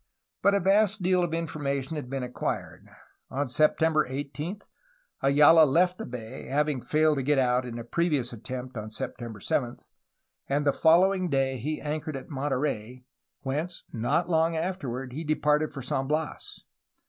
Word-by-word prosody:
But 200 Hz, 0 st, +4 dB
a -, -, +3 dB
vast 200 Hz, +1 st, +3 dB
deal 180 Hz, 0 st, +3 dB
of 175 Hz, -2 st, -1 dB
information 150 Hz, -3 st, -2 dB
had 145 Hz, -5 st, -5 dB
been 135 Hz, -1 st, -3 dB
acquired. 125 Hz, 0 st, -4 dB, 0.4 s
On 140 Hz, +1 st, -2 dB
September 155 Hz, +4 st, +3 dB
18 145 Hz, +8 st, -4 dB, 0.6 s
Ayala 150 Hz, +4 st, +7 dB
left 175 Hz, +6 st, +2 dB
the -, -, -5 dB
bay, 115 Hz, -3 st, -7 dB
— -, -, -10 dB
having 150 Hz, -2 st, +1 dB
failed 155 Hz, +1 st, +2 dB
to -, -, 0 dB
get 145 Hz, +2 st, +2 dB
out 125 Hz, -1 st, +2 dB
in 120 Hz, -1 st, -6 dB
a 120 Hz, -, -5 dB
previous 140 Hz, -2 st, 0 dB
attempt 125 Hz, +2 st, -7 dB
on 110 Hz, 0 st, -5 dB
September 110 Hz, 0 st, -6 dB
7, 120 Hz, +4 st, -1 dB, 0.4 s
— -, -, -53 dB
and 145 Hz, +2 st, +1 dB
the 140 Hz, -, +3 dB
following 185 Hz, +3 st, +4 dB
day 135 Hz, -2 st, +1 dB
he 150 Hz, +6 st, -3 dB
anchored 155 Hz, 0 st, -3 dB
at 135 Hz, -, -10 dB
Monterey, 130 Hz, -3 st, -2 dB, 0.4 s
whence 155 Hz, +6 st, -3 dB
not 135 Hz, +9 st, 0 dB
long 165 Hz, -1 st, +2 dB
afterward 135 Hz, -8 st, -3 dB
he 155 Hz, +5 st, -4 dB
departed 150 Hz, 0 st, +1 dB
for 140 Hz, -3 st, -7 dB
San 135 Hz, +1 st, -1 dB
Bias. 155 Hz, +1 st, -3 dB
145 Hz, 165 wpm, -27 LUFS, 130-160 Hz, 0.6 s, Ayala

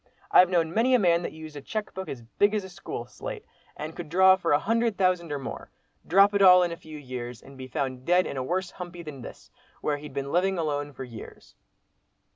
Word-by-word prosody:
I've 180 Hz, -, +7 dB
known 170 Hz, -3 st, +1 dB
many 245 Hz, +5 st, +3 dB
a -, -, +6 dB
man 170 Hz, -4 st, +3 dB
that -, -, -4 dB
used 155 Hz, -1 st, -10 dB
a 145 Hz, -, -7 dB
cheque 215 Hz, +8 st, -4 dB
book 190 Hz, 0 st, -6 dB
as 120 Hz, -3 st, -7 dB
big 205 Hz, -, +1 dB
as 210 Hz, -, -1 dB
a 190 Hz, -, -9 dB
school 180 Hz, -9 st, -7 dB
slate, 120 Hz, -, -8 dB, 0.3 s
and 155 Hz, +1 st, -6 dB
could 170 Hz, -3 st, -7 dB
draw 190 Hz, +3 st, +6 dB
for 175 Hz, -3 st, -2 dB
a 145 Hz, -, +6 dB
hundred 230 Hz, +4 st, 0 dB
thousand 180 Hz, -4 st, +1 dB
or 145 Hz, -, -1 dB
more, 135 Hz, -, -7 dB, 0.4 s
drop 200 Hz, +4 st, +5 dB
it 200 Hz, -, +2 dB
all 180 Hz, -1 st, +8 dB
in 175 Hz, -, -1 dB
a -, -, -4 dB
few 160 Hz, -2 st, -11 dB
years, 125 Hz, -4 st, -7 dB
and 135 Hz, 0 st, -14 dB
be 130 Hz, -1 st, -8 dB
found 130 Hz, -1 st, -3 dB
dead 180 Hz, +4 st, +3 dB
in -, -, -5 dB
a 130 Hz, -, -2 dB
worse 180 Hz, +7 st, -2 dB
'humpy' 175 Hz, -1 st, -8 dB
than 150 Hz, -5 st, -8 dB
this, -, -, -11 dB, 0.3 s
where 145 Hz, -1 st, -1 dB
he'd 145 Hz, -1 st, -10 dB
been 140 Hz, 0 st, -3 dB
living 190 Hz, +2 st, +2 dB
alone 145 Hz, -3 st, -2 dB
for 135 Hz, -, -8 dB
years." 115 Hz, -3 st, -11 dB
170 Hz, 240 wpm, -27 LUFS, 140-190 Hz, 0.4 s, all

